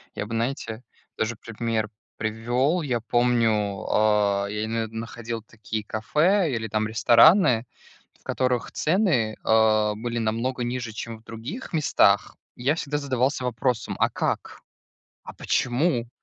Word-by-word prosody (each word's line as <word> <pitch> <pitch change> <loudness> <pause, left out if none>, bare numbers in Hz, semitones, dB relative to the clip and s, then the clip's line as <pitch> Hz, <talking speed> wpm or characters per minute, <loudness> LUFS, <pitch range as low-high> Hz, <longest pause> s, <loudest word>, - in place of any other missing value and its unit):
Я - - -3
бы, 115 +2 -5
знаете, 115 -1 -3 0.3
тоже 110 +1 -1
пример 115 -1 -3 0.3
привёл. 120 +9 0
Я 125 -5 -1
помню, 115 -4 +1
а, 105 -2 +2
я 105 +1 -2
имею 115 0 -1
в - - -15
виду, 115 - -9
находил 115 0 -6
такие 110 -1 -6
кафе, 155 - +1
или 110 -2 -2
там 110 +1 -1
рестораны, 120 - +5 0.5
в - - -31
которых 125 -2 -1
цены, 155 - +1
а, 110 -1 +3
были 120 +2 -4
намного 115 +3 -1
ниже, 120 -1 -3
чем 115 0 -6
в 110 - -26
других 125 - -8
местах. 155 -2 +3 0.2
И 120 - -11
я 140 +4 +3
всегда 150 -2 -2
задавался 130 -1 0
вопросом: 125 -1 -1
"А - - +3
как? - - -3 0.6
А - - -8
почему?" 125 -1 0
115 Hz, 145 wpm, -25 LUFS, 110-130 Hz, 0.6 s, рестораны